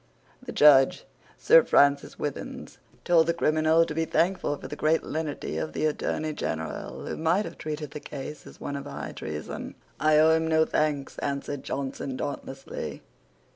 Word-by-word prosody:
The - - -7
Judge, 145 +3 +5 0.3
Sir - - +6
Francis 140 - +3
Withins, 145 -2 -6 0.3
told 165 -2 +4
the 170 - +1
criminal 155 0 +3
to 150 - -5
be 165 +1 0
thankful 170 -3 +1
for - - -8
the - - -6
great 155 +1 +2
lenity 155 -1 -3
of - - -4
the - - -1
Attorney 155 0 -1
General, 80 - -4
who - - -4
might 170 +6 +1
have - - -9
treated 150 -1 -5
the 150 - -6
case 145 +1 -8
as - - -14
one 140 - -4
of 140 - -5
high 70 0 -6
treason. 75 0 -6 0.2
"I 155 0 +4
owe 160 +1 +6
him 160 0 +2
no 160 0 +4
thanks," 150 -3 -1
answered 140 0 -3
Johnson, 135 -1 -4
dauntlessly. 135 -1 -6
150 Hz, 170 wpm, -27 LUFS, 140-160 Hz, 0.3 s, Sir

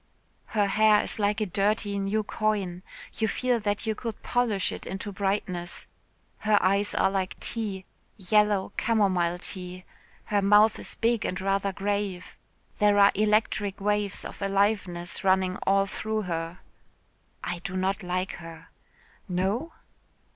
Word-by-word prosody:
"Her 205 - +4
hair 210 +1 +4
is - - 0
like 205 +1 +1
a - - +2
dirty 205 +2 0
new 200 +2 0
coin. 200 -4 -1 0.4
You 220 - +2
feel 250 +1 0
that 205 0 -1
you 220 - +1
could 225 0 -6
polish 230 -6 +1
it - - -7
into 195 +2 -5
brightness. 190 -3 -2 0.5
Her 215 -1 +3
eyes 200 +2 +2
are 190 - +3
like 190 -1 -2
tea 205 -5 -3 0.3
yellow 205 0 +2
camomile 185 -6 +2
tea. 180 0 -7 0.4
Her 205 -1 +1
mouth 210 +2 +5
is - - -7
big 230 -1 +1
and 180 - -2
rather 195 +1 0
grave. 200 -2 -3 0.4
There 205 -1 +4
are 200 0 +7
electric 210 -1 +1
waves 205 0 -1
of - - -8
aliveness 195 -3 0
running 190 0 +2
all 195 0 +4
through 215 +2 -3
her." 165 -1 -4 0.8
"I 175 0 -3
do 185 +1 -5
not 190 +2 0
like 185 +1 -2
her." 165 -1 -11 0.6
"No?" 195 - -1
200 Hz, 140 wpm, -27 LUFS, 185-210 Hz, 0.8 s, are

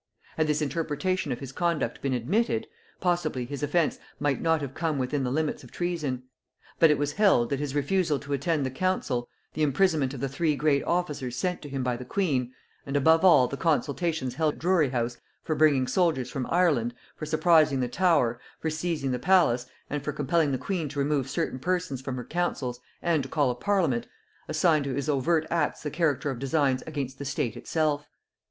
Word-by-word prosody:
Had 155 -1 +1
this 150 0 +1
interpretation 165 +5 -1
of 125 - -3
his 135 -2 -6
conduct 170 +2 -1
been 135 -2 0
admitted, 220 - 0 0.4
possibly 175 -8 0
his 140 +3 -6
offence 150 +2 +1 0.2
might 145 -2 0
not 165 -1 +2
have 135 -2 -5
come 160 -2 -1
within 135 +2 -1
the 125 - 0
limits 150 +2 -1
of 125 - -14
treason: 155 -8 -2 0.6
but 165 - +7
it 150 - +4
was 145 +1 -1
held, 170 - +3
that 140 - 0
his 145 -1 -3
refusal 155 +1 +1
to 140 +1 -5
attend 145 +1 0
the 130 - -2
council; 130 -6 -1 0.2
the 155 - -3
imprisonment 150 -1 +2
of - - -7
the 135 - -1
three 150 +3 0
great 140 0 +2
officers 150 -8 -1
sent 180 +6 -2
to 145 - -8
him 135 -1 -3
by 125 -1 0
the 125 - -7
queen; 130 -5 0 0.3
and 140 +1 -1
above 160 +4 +4
all 145 -9 +7
the 140 - -4
consultations 160 -3 0
held 155 -2 0
at - - -15
Drury 170 -4 +3
house 120 -1 -2 0.3
for 160 - -1
bringing 145 -4 +4
soldiers 160 -4 +1
from 135 -4 -3
Ireland, 150 -10 +2 0.2
for 155 - -6
surprising 155 -3 +4
the 125 - 0
Tower, 125 -6 +2 0.2
for 160 - -2
seizing 155 -4 -2
the 125 - -1
palace, 130 -7 +3 0.2
and 145 0 -3
for 150 - -2
compelling 150 +1 +1
the 130 - 0
queen 170 -1 -3
to 145 - -9
remove 140 -2 0
certain 130 - -2
persons 175 -4 -1
from 130 -1 -4
her 125 -2 -5
counsels 140 -8 -2 0.2
and 170 -3 +2
to - - -7
call 145 -5 +2
a - - -4
parliament, 160 - 0 0.4
assigned 155 -5 +2
to 135 -2 -2
his 140 +2 -2
overt 155 +3 +2
acts 160 -3 0
the 150 - -3
character 150 -3 0
of 125 - -6
designs 135 -1 +1
against 140 -4 -4
the - - -4
state 130 -4 -2
itself. 150 -2 -1
145 Hz, 200 wpm, -27 LUFS, 130-165 Hz, 0.6 s, but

